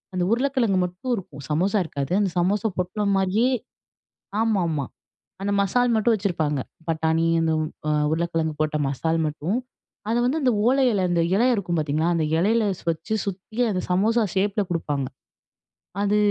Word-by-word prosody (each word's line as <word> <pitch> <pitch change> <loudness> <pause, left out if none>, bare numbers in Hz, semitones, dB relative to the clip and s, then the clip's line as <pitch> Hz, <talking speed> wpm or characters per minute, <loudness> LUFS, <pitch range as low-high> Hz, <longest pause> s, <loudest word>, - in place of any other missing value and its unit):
அந்த 180 - +1
உருளைக்கிழங்கு 240 -6 +2
மட்டும் 180 +8 -3
இருக்கும். 145 -8 -8
சமோசா 185 +8 +1
இருக்காது. 140 0 -4
அந்த 195 - +1
சமோசா 200 +4 +1
பொட்டலம் 200 +3 0
மாரியே 210 +7 +2 0.9
ஆமாமா 170 - +1 0.6
அந்த 200 0 0
மசால் 245 +5 +2
மட்டும் 225 +1 +3
வச்சிருப்பாங்க. 165 -8 -1 0.3
பட்டாணி 160 0 +1 0.2
அந்த 160 0 +1 0.4
அ - - +2 0.2
உருளைக்கிழங்கு 165 -1 -1
போட்ட 155 0 +1
மசால் 160 +4 -1
மட்டும். 155 +8 -2 0.5
அத 230 - +1
வந்து 275 +6 +1
அந்த 250 -2 +3
ஓலை 265 +1 +4
இல 195 -2 +1
அந்த 170 -1 +2
இலை 235 +5 +3
இருக்கும் 175 -5 -1
பார்த்தீங்களா! 155 +2 0
அந்த 160 -2 +1
இலையில 220 +5 +3
ஸ் - - -14
வச்சு 165 +7 -3
சுத்தி 200 +3 -6
அந்த 185 -2 -1
சமோசா 220 +6 +3
ஷேப்ல 200 +2 +1
கொடுப்பாங்க. 145 -5 -1 1.0
அது 205 +1 +2
185 Hz, 150 wpm, -24 LUFS, 160-220 Hz, 1.0 s, ஓலை